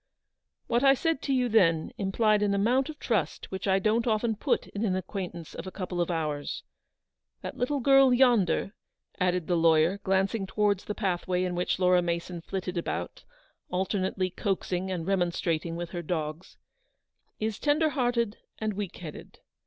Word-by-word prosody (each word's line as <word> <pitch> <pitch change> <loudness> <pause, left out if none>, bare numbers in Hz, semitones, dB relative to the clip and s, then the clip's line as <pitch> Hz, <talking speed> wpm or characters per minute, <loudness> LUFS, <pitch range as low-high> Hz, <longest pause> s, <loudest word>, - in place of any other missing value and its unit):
" - - -57
What 240 +2 +3
I 270 0 +7
said 325 +1 0
to 280 - -2
you 255 -2 +2
then 175 -8 +3
implied 210 +2 +2
an 200 -1 +2
amount 245 +8 +2
of 310 - -7
trust 200 - -2
which 190 +1 -4
I 190 0 +4
don't 220 +4 +1
often 220 0 +1
put 200 - 0
in 205 - -5
an 190 -4 +1
acquain 185 0 -5
tance 170 -2 -10
of 170 - -7
a - - -5
couple 180 -2 -3
of 175 - -1
hours. 150 -4 -2 0.8
That - - -5
little 280 +3 0
girl 270 0 +6
yonder," 235 -7 +3 0.5
added 180 -2 +1
the 175 - +1
lawyer, 165 +3 +4
glancing 195 +1 0
towards 205 -1 +1
the 210 - -4
pathway 185 -2 -1
in 180 -1 -1
which 175 0 0
Laura 180 -1 +4
Mason 170 0 -3
flitted 185 0 -3
about, - - -4 0.4
alternately 185 0 -1
coaxing 190 -1 -2
and 175 -3 -3
remonstrating 170 -3 0
with 170 0 -5
her 175 - -4
dogs, 160 +1 -4 0.8
"is 215 -1 -2
tender 305 +2 +2
hearted 240 -6 0 0.2
and 215 -1 -2
weak 200 -2 -5
headed. 160 -4 -9
190 Hz, 170 wpm, -28 LUFS, 175-220 Hz, 0.8 s, I